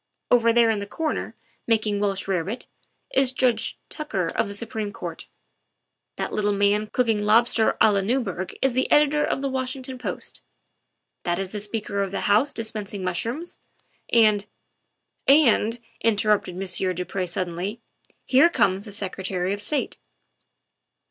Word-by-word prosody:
Over 230 -1 +5
there 230 -1 +4
in 215 - -1
the 200 - -5
corner, 315 +7 -3 0.3
making 215 -3 +1
Welsh 200 -1 -1
rarebit, 195 +5 -2 0.5
is 270 -1 +4
Judge 240 -3 +1
Tucker 195 - -3
of 220 - 0
the 200 - -4
Supreme 215 -1 -3
Court; - - -7 0.9
that - - -4
little 205 -1 +1
man 205 +1 +2
cooking 225 -3 +1
lobster 225 +1 +3
a 220 - +6
la 200 - +2
Newberg 195 -5 -2
is 270 -2 +2
the 255 +1 0
editor 295 0 +4
of 270 - -1
the - - +1
Washington 260 0 -4
Post; - - -6 0.8
that 175 -1 -1
is 195 -1 -4
the 210 - -4
Speaker 205 -1 -2
of 195 - -1
the 195 - -3
House 220 +8 +3
dispensing 215 -4 -4
mushrooms, 230 - -3 0.5
and 215 -3 +4 0.8
''And," 240 -5 +4 0.2
interrupted 210 -4 +2
Monsieur 185 0 0
du 180 +1 -4
Pre 185 -1 -3
suddenly, 180 +4 -3 0.2
" - - -29
here 275 +6 +5
comes 190 - +2
the 205 0 -10
Secretary 190 -2 -3
of 205 - -5
State." 285 +7 -2
210 Hz, 150 wpm, -24 LUFS, 195-240 Hz, 0.9 s, a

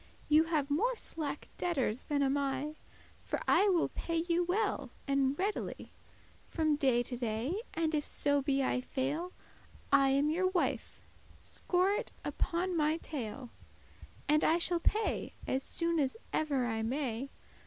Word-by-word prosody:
Ye 310 +1 +6
have 300 -4 0
more 465 +12 +2
slacke 295 -8 -4
debtors 270 -9 0
than 285 -1 +2
am 270 0 +2
I; 280 +1 -1 0.5
For - - -2
I 410 - +5
will 350 -3 +2
pay 335 - -4
you 345 0 +2
well 360 - 0 0.2
and 275 0 +2
readily, 405 +3 -3 0.6
From 310 -2 +1
day 260 -4 +3
to 245 - -3
day, 240 - -2
and 320 -1 0
if 300 -1 +1
so 285 0 +1
be 275 -1 +1
I 255 - +1
fail, 285 +8 -2 0.6
I 275 -1 +5
am 280 +3 +3
your 370 +4 +2
wife, 370 -1 -1 0.4
score 365 +2 0
it 445 +3 -1
upon 355 +2 -1
my 310 0 +2
tail, 260 -6 -5 0.8
And 300 +1 +4
I 325 - +4
shall 345 0 +2
pay 430 +6 0
as 265 - 0
soon 335 +3 -1
as 275 +6 0 0.2
ever 280 -5 +1
I 225 -2 -1
may. 255 +1 -2
295 Hz, 155 wpm, -32 LUFS, 270-340 Hz, 0.8 s, Ye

